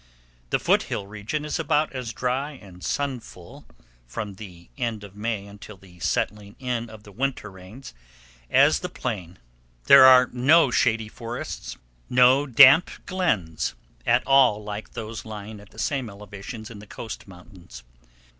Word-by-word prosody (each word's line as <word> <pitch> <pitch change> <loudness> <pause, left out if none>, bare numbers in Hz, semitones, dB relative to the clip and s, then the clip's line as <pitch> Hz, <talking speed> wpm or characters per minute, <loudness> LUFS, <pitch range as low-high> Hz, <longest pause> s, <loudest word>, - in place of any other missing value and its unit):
The - - +2
foot - - +2
hill 100 - -3
region 110 +9 -5
is 150 - -3
about 155 -1 +1
as 125 -4 -5
dry 130 +6 -2
and 95 -8 -14
sunful, 125 -11 -5 0.4
from 105 - -5
the 90 -4 -12
end 115 -5 -3
of 100 -1 -12
May 105 -1 -3
until 100 0 -12
the 90 -2 -18
setting 100 +3 -2
in 120 -3 -3
of 110 -1 -13
the 105 - -14
winter 125 -2 -3
rains, 95 - -12 0.6
as - - +4
the - - -5
plain. 95 -8 -5 0.5
There 140 - +8
are 130 -1 +8
no 135 +3 +4
shady 115 -3 +1
forests, 115 - -7 0.3
no 125 +3 +5
damp 135 +6 +7 0.2
glens, 95 - -1 0.3
at - - +2
all 130 -6 +4
like 105 +1 -7
those 110 0 -6
lying 105 -1 -8
at 105 - -16
the - - -20
same 135 -5 -2
elevations 105 +3 -9
in 105 - -10
the 105 - -13
Coast 110 0 -8
Mountains. 90 - -14
110 Hz, 155 wpm, -24 LUFS, 100-130 Hz, 0.6 s, There